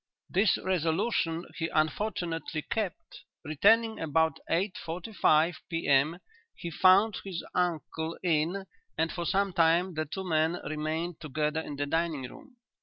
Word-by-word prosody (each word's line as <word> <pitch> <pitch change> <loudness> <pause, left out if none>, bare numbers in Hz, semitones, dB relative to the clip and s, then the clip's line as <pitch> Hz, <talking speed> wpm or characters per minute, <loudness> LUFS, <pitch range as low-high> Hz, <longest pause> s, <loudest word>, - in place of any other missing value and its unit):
"'This 195 +3 +3
resolution 165 -1 0
he 165 - 0
unfortunately 165 -1 -1
kept. 210 -6 -4 0.2
Returning 220 +9 +3
about 160 +1 +1
eight 185 +3 0
forty 170 +6 -6
five 160 -2 +3
P.M. 155 -1 +2 0.4
he 170 - -6
found 195 +6 +5
his 185 -4 -5
uncle 165 -2 -1
in 175 +3 +1 0.3
and 160 +1 +1
for 170 -1 -3
some 195 0 +1
time 170 +2 +3
the 155 0 -2
two 190 +6 -5
men 160 0 +2
remained 155 +2 -3
together 150 +1 -1
in 145 - -7
the 145 +1 -1
dining 160 -3 -1
room. 270 - -15
165 Hz, 135 wpm, -29 LUFS, 155-185 Hz, 0.4 s, found